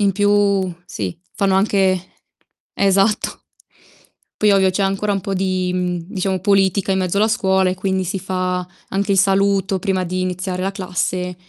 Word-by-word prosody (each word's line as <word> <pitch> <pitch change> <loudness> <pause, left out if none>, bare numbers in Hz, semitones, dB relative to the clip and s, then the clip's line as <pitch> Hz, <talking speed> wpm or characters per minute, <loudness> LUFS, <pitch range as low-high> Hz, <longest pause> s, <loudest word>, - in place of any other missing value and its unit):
In 200 -1 +3
più, 200 -2 +2
sì, 95 - -5 0.2
fanno 195 -1 +2
anche 190 -2 +2 0.7
esatto! 200 +2 +1 0.9
Poi 210 -1 +3
ovvio 190 -1 +4
c'è 185 +2 -1
ancora 195 +2 0
un 195 - -1
po' 195 +1 -3
di, 185 -1 -1
mhmm, 180 -1 -1
diciamo, 190 -2 -1
politica 195 0 +2
in 190 - +1
mezzo 185 0 -1
alla 210 +2 +4
scuola 190 -5 +2
e - - -2
quindi 190 0 -1
si 185 +2 -3
fa 185 -1 -2 0.3
anche 200 +1 -1
il 195 - +2
saluto 195 0 +2
prima 190 -1 0
di 185 +1 -3
iniziare 185 0 -3
la 195 - 0
classe. 180 -1 -2
190 Hz, 165 wpm, -19 LUFS, 185-200 Hz, 0.9 s, ovvio